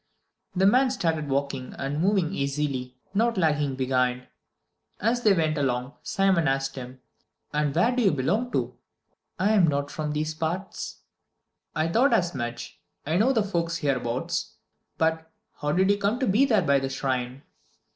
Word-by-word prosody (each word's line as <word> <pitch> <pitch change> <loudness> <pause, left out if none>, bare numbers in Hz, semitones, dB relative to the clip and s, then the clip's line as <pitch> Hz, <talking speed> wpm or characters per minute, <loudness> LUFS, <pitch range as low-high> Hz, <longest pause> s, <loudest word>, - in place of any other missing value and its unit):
The 190 +1 +3
man 255 +6 +5
started 165 - -1
walking, 135 -1 -2
and 140 +3 -2
moved 190 -3 +2
easily, 140 -3 -2 0.2
not 230 +2 +1
lagging 150 -5 +1
behind. 125 -1 0 0.7
As 235 +4 +1
they 215 - +5
went 160 -4 +1
along, 125 -1 -1
Simon 190 -5 +2
asked 135 0 0
him, 130 0 -9 0.5
"And 150 -1 0
where 230 +9 +3
do 255 - +2
you 200 - +4
belong 185 - 0
to?" - - -1 0.6
"I'm 200 -2 +4
not 145 -1 -1
from 150 -1 -3
these 155 +1 -1
parts." 170 +5 -4 0.7
"I 155 - +1
thought 240 +9 +3
as 175 -6 +2
much. 120 -2 -5 0.3
I 160 +4 +1
know 225 +7 +4
the 225 -5 +2
folks 170 -4 -1
hereabouts. 130 -3 -2 0.4
But, 160 0 0 0.3
how 150 0 -1
did 190 +4 +3
you 205 - +1
come 205 +4 0
to 260 - +1
be 225 +5 +4
there 220 -8 +3
by 140 -3 +3
the 135 0 -3
shrine?" 130 -1 -2
155 Hz, 160 wpm, -26 LUFS, 135-195 Hz, 0.7 s, man